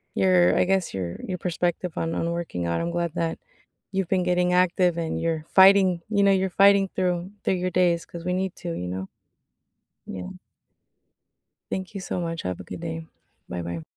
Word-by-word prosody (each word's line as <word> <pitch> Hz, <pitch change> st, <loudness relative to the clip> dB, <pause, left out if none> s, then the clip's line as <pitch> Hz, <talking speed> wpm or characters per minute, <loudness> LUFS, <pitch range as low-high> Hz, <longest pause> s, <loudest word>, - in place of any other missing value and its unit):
your, 185 Hz, -2 st, +4 dB
I -, -, +4 dB
guess, 190 Hz, -1 st, +1 dB
your 90 Hz, -3 st, -4 dB
your 185 Hz, -1 st, -3 dB
perspective 175 Hz, 0 st, -2 dB
on 165 Hz, 0 st, -1 dB
on 170 Hz, -, -1 dB
working 170 Hz, -, -3 dB
out, 85 Hz, 0 st, -1 dB
I'm 170 Hz, -, -2 dB
glad 170 Hz, -1 st, -2 dB
that 165 Hz, 0 st, -2 dB, 0.5 s
you've 195 Hz, -2 st, -1 dB
been 185 Hz, -2 st, +2 dB
getting 180 Hz, 0 st, +2 dB
active 180 Hz, -1 st, +3 dB
and 165 Hz, -1 st, -2 dB
you're 160 Hz, -2 st, -1 dB
fighting, 190 Hz, -2 st, +6 dB
you 200 Hz, -2 st, +2 dB
know, 200 Hz, -, +5 dB
you're 190 Hz, 0 st, +2 dB
fighting 195 Hz, +1 st, +5 dB
through 180 Hz, -1 st, 0 dB
through -, -, +1 dB
your 185 Hz, -, 0 dB
days 175 Hz, -2 st, +2 dB
'cause 170 Hz, -1 st, -9 dB
we 180 Hz, -, 0 dB
need 185 Hz, 0 st, -2 dB
to, 175 Hz, -, -6 dB
you 90 Hz, -, -4 dB
know? 95 Hz, +1 st, -4 dB, 1.0 s
Yeah. 90 Hz, -1 st, -6 dB, 1.4 s
Thank 190 Hz, 0 st, -4 dB
you 195 Hz, -, -5 dB
so 185 Hz, -, -3 dB
much, 165 Hz, -1 st, -3 dB
have 90 Hz, -1 st, -3 dB
a -, -, -7 dB
good 130 Hz, -, -8 dB
day. 165 Hz, -1 st, -5 dB, 0.4 s
Bye-bye. 85 Hz, -1 st, -4 dB
175 Hz, 190 wpm, -25 LUFS, 165-185 Hz, 1.4 s, fighting